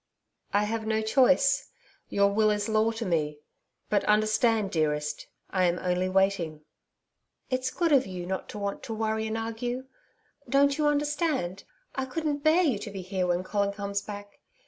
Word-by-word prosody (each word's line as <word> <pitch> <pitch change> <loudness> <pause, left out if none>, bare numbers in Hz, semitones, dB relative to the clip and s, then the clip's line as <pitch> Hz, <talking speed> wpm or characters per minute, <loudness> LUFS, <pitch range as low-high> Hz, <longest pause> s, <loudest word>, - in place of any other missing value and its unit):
'I 205 +1 +3
have 220 +1 -2
no 220 0 +1
choice. 270 +4 +3 0.4
Your 200 0 +3
will 215 +1 +3
is 210 -1 0
law 220 0 +3
to 225 0 -4
me. 150 -5 0 0.5
But 205 - +1
understand, 215 0 +2
dearest 150 -2 -1 0.2
I 185 -1 +2
am 175 0 +2
only 180 +1 0
waiting.' 185 -5 +1 0.9
'It's 255 0 0
good 335 +3 0
of 270 -7 +4
you 180 -2 -5
not 190 +1 -4
to - - -7
want 200 -1 -3
to 225 - -5
worry 220 0 -1
and 220 +1 -2
argue.... 240 +3 -3 0.6
Don't 280 +2 +3
you 300 - +3
understand? 295 - 0 0.3
I 265 - -2
couldn't 295 +2 -2
bear 315 +5 +4
you 260 - +1
to 210 - -6
be 195 -2 -6
here 185 0 -1
when 175 +1 +1
Colin 200 +1 0
comes 200 0 -3
back. 205 -1 -9
215 Hz, 170 wpm, -28 LUFS, 190-255 Hz, 0.9 s, of